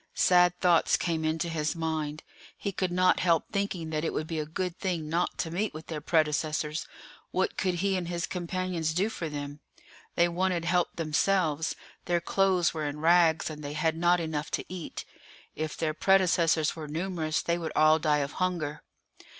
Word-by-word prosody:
Sad 180 -1 +4
thoughts 175 -2 +4
came 165 -2 -1
into 160 +2 0
his 160 -1 -1
mind; 155 -2 -3 0.3
he 200 - -3
could 185 -1 -2
not 180 +1 +3
help 170 -3 +2
thinking 195 -5 -2
that 155 0 -1
it - - -1
would 155 - -2
be 160 0 -3
a 150 - -3
good 180 +2 -3
thing 175 -5 -2
not 170 +3 -1
to 165 - -2
meet 195 +1 -2
with 155 0 -8
their 155 -2 -5
predecessors; 155 -1 0 0.4
what - - 0
could 185 -3 0
he 195 -1 +2
and 180 -2 -2
his 175 0 -2
companions 175 -2 -2
do 195 +5 +2
for 165 -7 -4
them? 145 0 -6 0.6
They 170 - +4
wanted 175 0 0
help 175 0 +1
themselves; 160 0 +1 0.3
their 175 -1 +1
clothes 185 0 +2
were 155 -2 -2
in 145 +1 -5
rags, 165 0 +4
and 150 -1 -8
they 145 0 -5
had 160 +1 0
not 175 +2 +3
enough 160 -2 -3
to - - -8
eat. 180 -2 -7 0.5
If 155 -1 -4
their 155 -1 -1
predecessors 170 -3 +3
were 155 -2 -7
numerous 160 0 -2
they 170 0 0
would 165 -2 -4
all 155 +1 +5
die 150 -2 +2
of 140 - -9
hunger. 160 -5 -2
165 Hz, 185 wpm, -28 LUFS, 155-180 Hz, 0.6 s, all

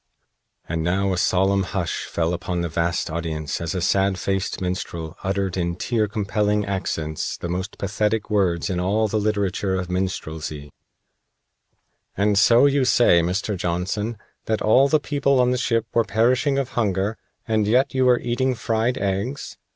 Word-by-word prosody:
And 80 -1 -2
now 95 +3 +1
a - - -2
solemn 95 +2 +2
hush 95 -3 -3
fell 85 +1 -1
upon 90 0 -3
the 85 - -2
vast 85 +1 -1
audience 80 -3 -3
as 85 +1 -3
a 90 - -1
sad 95 +1 +2
faced 95 0 -2
minstrel 85 -3 -4
uttered 95 -1 -1
in 85 -1 -1
tear 110 +3 0
compelling 105 0 0
accents 80 -5 -3
the - - -5
most 90 +4 -4
pathetic 105 +2 -1
words 95 -5 +1
in 90 -2 -2
all 105 +5 +1
the 110 +1 -1
literature 100 -2 0
of 90 -1 -3
minstrelsy: 80 -5 -4 1.4
"And 100 +1 +2
so 115 +6 +6
you 140 -1 +3
say, 120 -8 +5
Mr. 95 +4 -1
Johnson, 95 +6 -2 0.3
that 110 -1 -1
all 130 +6 +5
the 155 +2 +3
people 140 -2 +1
on 125 0 +3
the 125 - +1
ship 115 -3 +1
were 115 - +3
perishing 120 +7 +2
of 135 -2 -1
hunger, 100 -2 0 0.3
and 110 -2 +1
yet 125 +5 +2
you 130 -1 +2
were 125 -1 +4
eating 125 +2 0
fried 115 +2 0
eggs. 100 +8 -3
100 Hz, 165 wpm, -23 LUFS, 90-115 Hz, 1.4 s, so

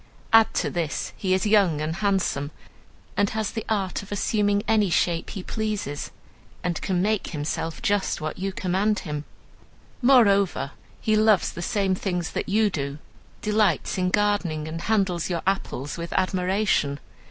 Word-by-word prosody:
Add 225 -1 +7
to - - 0
this, 165 -4 -2
he 190 - -2
is 190 - 0
young 200 -7 +4
and 155 +2 -2
handsome, 190 -9 0 0.7
and 205 0 +2
has 220 -2 -2
the 225 - -4
art 195 -4 -1
of 200 - -13
assuming 205 0 +1
any 215 -3 +3
shape 170 0 +1
he 190 - -6
pleases, 210 -11 -3 0.5
and 175 -2 -1
can 180 -1 0
make 215 0 0
himself 160 +1 -3
just 205 -1 +1
what 155 +3 -4
you 195 +1 -1
command 190 +3 0
him. 150 -2 -5 0.8
Moreover, 200 - +4 0.3
he 215 - +1
loves 215 -3 +4
the 170 - -7
same 195 +1 +1
things 180 -3 -2
that - - -3
you 210 +1 +3
do, 140 -3 -3 0.5
delights 210 -2 +1
in 180 0 +2
gardening, 195 -6 0
and 165 +1 -5
handles 190 -4 +1
your 170 -2 -2
apples 160 -7 -2
with 170 0 -5
admiration. 185 -5 +1
190 Hz, 155 wpm, -25 LUFS, 170-210 Hz, 0.8 s, Add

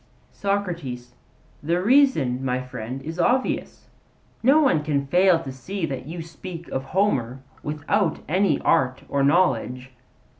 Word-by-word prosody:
SOCRATES: 170 -12 -3 0.5
The 170 +4 0
reason, 190 - +3
my 125 -1 0
friend, 130 0 -6
is 165 +3 -6
obvious. 250 +9 0 0.5
No 275 +6 +5
one 180 - +3
can 145 -2 0
fail 180 +4 +4
to 135 - -6
see 170 +8 -4
that 135 -3 -5
you 165 +1 -6
speak 170 +1 -9
of 135 0 -3
Homer 135 - 0 0.2
without 155 +6 0
any 180 -1 +2
art 130 -1 +1
or 140 -1 0
knowledge. 130 -5 +1
155 Hz, 135 wpm, -24 LUFS, 130-185 Hz, 0.5 s, No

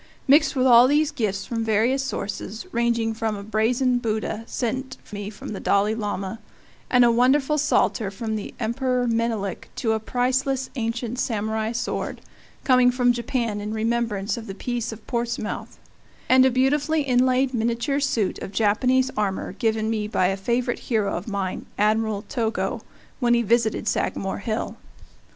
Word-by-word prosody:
Mixed 295 +3 +5
with 255 -1 +2
all 240 -1 +8
of - - +2
these 300 +1 +3
are - - -26
gifts 210 -8 -2
from 230 -1 -2
varied 225 +5 +2
sources, 215 - -4
ranging 235 -2 +1
from 220 -1 -2
a 200 - -7
brazen 240 +4 +1
Buddha 220 -1 -2
sent 260 +2 -3 0.2
me 205 0 -4
by 210 - -12
the 205 - -5
Dalai 200 +2 +2
Lama 205 -1 -3 0.5
and 250 -1 +5
a 235 - +5
wonderful 265 +5 +3
psalter 255 -7 +1
from 220 +2 -4
the 210 - -5
Emperor 250 +2 0
Menelik 225 -5 -1
to 225 - 0
a 220 - +1
priceless 260 +3 0
ancient 240 0 -3
Samurai 220 -2 -1
sword, 235 0 -3 0.4
coming 255 -1 +5
from 245 -1 +3
Japan 235 -3 -2
in 210 +1 -4
remembrance 225 -1 -1
of 230 -1 -7
the 195 - -6
peace 240 +2 -3
of 220 0 -10
Portsmouth, 235 -2 -3 0.5
and 260 0 +6
a - - +4
beautifully 290 +4 +2
inlaid 255 0 +2
miniature 235 +4 0
suit 240 -8 0
of - - -6
Japanese 250 +5 +2
armor, 200 -2 -1
given 220 +1 0
me 215 -2 -1
by 185 -4 +1
a 195 - 0
favorite 240 +5 -1
hero 215 -5 0
of 175 - -5
mine, 200 -3 -3
Admiral 215 0 +1
Togo, 225 -3 -2 0.4
when 240 -2 +3
he 235 - +2
visited 225 -1 +1
Sagamore 195 -2 -1
Hill. 220 +1 -3
230 Hz, 165 wpm, -24 LUFS, 215-255 Hz, 0.5 s, all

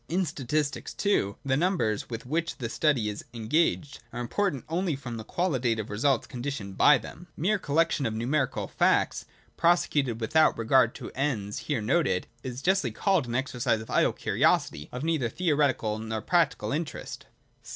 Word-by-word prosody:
In 185 +3 +1
statistics, 150 0 -2
too, 105 - +1
the 130 -1 +2
numbers 150 - 0
with 115 0 -6
which 165 +5 -2
the 115 -3 -4
study 130 -4 +1
is 105 -1 -4
engaged 145 +4 0
are - - -6
im 120 -1 -4
portant 190 - -1
only 170 -1 -1
from 120 -4 -6
the 110 - -6
qualitative 120 - -1
results 130 +7 +1
conditioned 120 -7 -5
by 150 +6 +6
them. 175 +7 -10
Mere 200 +6 +1
collection 155 -3 +1
of 110 - -3
numerical 130 +4 -1
facts, - - +1 0.3
prosecuted 145 -8 +2
without 155 +8 +3
re 115 - -3
gard 120 -1 +4
to - - -7
the - - -19
ends 110 -8 -1
here 140 -7 0
noted, 110 - +1 0.2
is 130 +1 -6
justly 190 -8 +2
called 170 - +1
an 120 - -3
exercise 125 -3 0
of 110 - -9
idle - - +3
curiosity, 75 - +1
of 125 +2 -5
neither 155 -7 0
theoretical 140 -9 +1
nor 110 0 -3
practical 170 -4 +1
interest. 155 +2 -5
135 Hz, 170 wpm, -27 LUFS, 115-160 Hz, 0.3 s, by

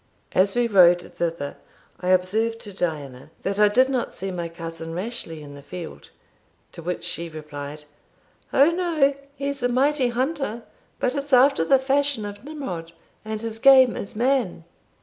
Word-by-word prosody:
As 195 +3 +2
we 245 0 +3
rode 175 -5 +5
thither, 165 -4 -3 0.4
I 180 - -5
observed 215 +5 +1
to 205 - -9
Diana, 150 -7 -4
"that 195 +1 -2
I 210 - +7
did 255 +5 +4
not 260 -3 -2
see 195 +1 -4
my 170 -2 -4
cousin 165 -1 -7
Rashleigh 180 -6 -5
in 145 -1 -10
the 140 - -11
field;" 165 +3 -9 0.6
to - - -10
which 175 +1 -4
she 170 0 -2
replied, 150 -1 -8 0.7
"O 280 +5 +5
no 335 -5 +2 0.2
he's 280 0 -3
a 245 - +1
mighty 265 +2 +2
hunter, 250 -1 -2 0.4
but 255 - 0
it's 280 -1 -4
after 255 -7 +6
the 270 +11 +5
fashion 275 -3 0
of 205 +1 -8
Nimrod, 190 - -6 0.3
and 215 0 -4
his 225 -1 -4
game 260 -1 +7
is 200 - -6
man." 240 -7 +1
210 Hz, 165 wpm, -24 LUFS, 170-265 Hz, 0.7 s, I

